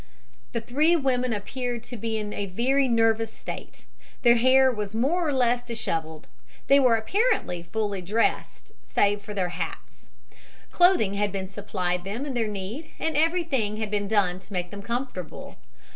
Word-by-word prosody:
The 235 - -2
three 295 +9 +3
women 255 -5 +1
appeared 240 +3 -3
to 245 - -8
be 225 0 -2
in 210 -1 -4
a 200 - -3
very 260 +8 +2
nervous 225 -1 +2
state. - - -9 0.4
Their 240 -1 +6
hair 260 +2 +5
was 210 -3 -4
more 320 +9 +1
or - - +1
less 245 -2 +2
dishevelled. 165 -10 -4 0.4
They 275 +1 +6
were 250 -4 +5
apparently 375 - 0
fully 200 +2 -3
dressed 210 +6 -1
save 205 0 +1
for 205 +1 -8
their 185 -3 0
hats. 165 -1 -7 0.6
Clothing 350 - +4
had 205 0 0
been 190 -1 -4
supplied 185 -3 -2
them 215 +9 -4
in 280 - -4
their 230 -3 0
need 210 +9 -5
and 320 -1 -2
everything 300 - +1
had 215 -1 -3
been 205 -1 0
done 195 -4 +1
to 195 - -18
make 180 -1 -2
them 200 -1 -7
comfortable. 235 - -5
225 Hz, 165 wpm, -26 LUFS, 200-260 Hz, 0.6 s, Their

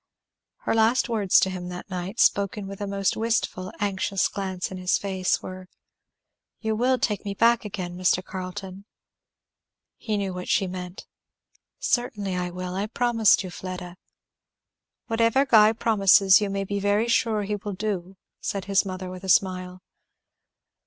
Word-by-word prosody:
Her - - -1
last 225 +3 +3
words 210 -5 +4
to 190 - +1
him 180 -1 -6
that 180 0 -7
night, 185 +4 -5
spoken 200 0 +2
with 195 +1 -8
a 205 - -2
most 195 -1 0
wistful 220 -5 -1
anxious 195 -1 0
glance 190 -2 -4
into 185 -1 -6
his 180 - +2
face, 190 -2 -1
were, 185 0 -8 0.9
"You 220 -1 -1
will 255 +3 +2
take 210 -4 -1
me 200 -1 -4
back 230 +1 +3
again, 185 -4 -5
Mr. 185 0 +1
Carleton?" 190 +1 -7 1.1
He 215 -2 -2
knew 195 -2 -2
what 180 0 -6
she 195 - +2
meant. 180 0 -7 0.7
"Certainly 210 -6 -1
I 180 0 -2
will. 180 0 -5
I 195 +3 -2
promised 230 -3 +3
you, 185 - -7
Fleda." 180 -1 -7 1.1
"Whatever 230 +4 +2
Guy 220 -5 +6
promises 200 -3 +5
you 205 - -1
may 195 0 -2
be 200 +1 -3
very 205 +3 +1
sure 225 -2 +1
he 205 +1 -2
will 205 0 -6
do," 190 -2 -4 0.2
said 195 -2 -3
his 200 -1 +3
mother 185 -1 -5
with 185 +1 -9
a 190 - -5
smile. 185 -1 +1
195 Hz, 160 wpm, -25 LUFS, 185-215 Hz, 1.1 s, Guy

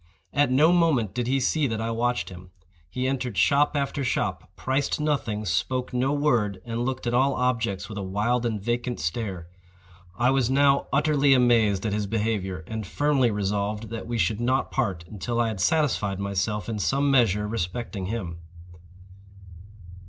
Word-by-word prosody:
At 145 -2 +3
no 150 +6 +5
moment 155 - +2
did 120 0 -2
he 135 +2 +2
see 145 +3 +1
that 110 -2 -3
I 115 +1 -2
watched 120 +2 -1
him. 90 0 -11 0.4
He 125 +7 -2
entered 125 -5 -2
shop 140 - +3
after 140 0 -1
shop, 125 - -2
priced 135 +3 -1
nothing, 135 -8 -1
spoke 125 +10 -1
no 130 +2 +1
word, 120 -10 +1
and 115 0 -3
looked 130 0 -3
at 120 - -1
all 130 +2 +3
objects 115 -6 -1
with 105 -2 -6
a - - -3
wild 105 +6 0
and 115 -3 -1
vacant 120 +3 -2
stare. 85 +1 -3 0.7
I 125 +2 +3
was 135 -3 +2
now 140 +1 +3
utterly 145 -1 +3
amazed 115 -5 +3
at 105 - 0
his 105 -1 -1
behavior, 100 -5 -2
and 110 -1 -5
firmly 145 -2 +2
resolved 105 +1 -2
that 115 0 -5
we 120 0 -2
should 105 +2 0
not 130 +2 0
part 95 -10 -1
until 115 +5 -3
I 115 -1 +2
had 105 -4 -4
satisfied 105 -6 +1
myself 100 0 -2
in 110 -2 -3
some 140 +7 +1
measure 105 -6 +3
respecting 100 -1 -4
him. 90 -6 -4
115 Hz, 170 wpm, -25 LUFS, 105-130 Hz, 0.7 s, no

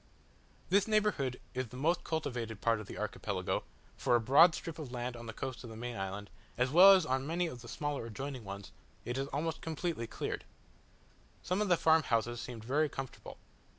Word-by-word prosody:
This 200 +2 +4
neighbourhood 210 - +1
is 130 -1 -2
the 125 - -10
most 165 +6 +1
cultivated 120 -9 -3
part 115 0 +2
of 105 - -8
the - - -8
Archipelago; - - -2 0.3
for 120 - +2
a - - +5
broad 145 +9 +6
strip 165 -1 -6
of 145 -5 -6
land 125 0 -3
on 120 0 -9
the - - -4
coast 130 +3 -5
of 120 - -8
the 110 - -8
main 120 +1 -5
island, 95 +1 -5 0.3
as 125 +2 +1
well 185 +5 +10
as 185 -4 +4
on 130 0 0
many 170 +3 0
of 125 -7 -6
the 120 - -11
smaller 145 -2 -3
adjoining 135 +2 -5
ones, 100 0 -7 0.3
is 135 +3 -2
almost 155 +3 -2
completely 160 -6 -3
cleared. - - -4 1.0
Some 185 +3 0
of 210 - +1
the 175 - +5
farm 160 0 +5
houses 120 -2 0
seemed 120 -3 -7
very 145 +6 +2
comfortable. 135 -3 -7
130 Hz, 195 wpm, -33 LUFS, 115-160 Hz, 1.0 s, well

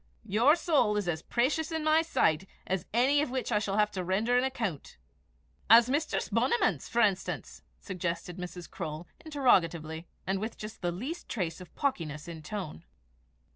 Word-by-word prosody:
Your 240 +10 +5
soul 300 -11 +2
is 205 -3 -1
as 160 -2 -1
precious 295 - 0
in 320 -1 -2
my 310 +1 +5
sight 190 - +1 0.2
as 190 -1 -2
any 265 +6 +4
of 295 - -1
which 255 -2 -2
I - - +3
shall 200 -1 -2
have 210 0 +3
to 185 -2 -3
render 205 +7 +1
an 250 - +4
account." 225 - -3 0.7
"As 235 +2 +8
Mistress 305 +3 0
Bonniman's, 245 - +1
for 235 0 +3
enstance?" 195 -3 -1 0.2
suggested 175 -2 -4
Mrs. 180 -1 -7
Croale, 155 +2 -6 0.2
interrogatively, 170 - +1 0.2
and 190 +1 0
with 220 +3 -4
just 215 +1 -8
the 175 - 0
least 260 - -6
trace 180 -5 -3
of 180 - -13
pawkiness 160 - -2
in 170 -1 -6
the - - -11
tone. 185 - -5
210 Hz, 175 wpm, -30 LUFS, 175-260 Hz, 0.7 s, As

